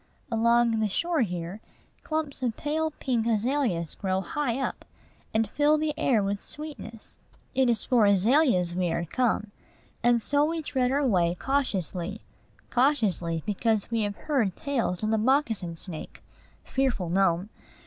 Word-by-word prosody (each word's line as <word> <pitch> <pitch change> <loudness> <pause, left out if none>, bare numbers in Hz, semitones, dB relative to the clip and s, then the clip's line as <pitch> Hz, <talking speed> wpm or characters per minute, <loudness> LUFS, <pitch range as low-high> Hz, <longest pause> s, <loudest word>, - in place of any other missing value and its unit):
Along 235 0 +3
the 215 -1 +1
shore 335 - 0
here, 180 -1 -3 0.4
clumps 310 -4 -3
of 240 -3 -1
pale 315 +2 -1
pink 250 -6 -1
azaleas 225 - 0
grow 190 -1 -1
high 260 +2 -2
up, 270 - -3 0.5
and 220 0 +1
fill 295 +7 +3
the 305 0 -1
air 250 -9 +2
with 200 0 -2
sweetness. 295 -7 -9 0.3
It 265 -2 +3
is 230 -3 0
for 235 -5 +4
azaleas 200 - +3
we 180 -1 0
are 170 - -1
come; 215 +1 0 0.5
and 240 0 +4
so 285 +5 +1
we 325 +1 -1
tread 255 -3 0
our 280 +1 +1
way 175 -7 +2
cautiously, 200 - -2 0.5
cautiously, 205 - +1
because 215 +1 0
we 230 -1 +1
have 205 -1 -2
heard 235 - 0
tales 235 -10 -1
of 215 - +1
the 220 - +2
moccasin 225 - +1
snake 165 -1 -8 0.4
fearful 255 -10 -1
gnome! 185 0 +2
225 Hz, 150 wpm, -27 LUFS, 195-275 Hz, 0.5 s, for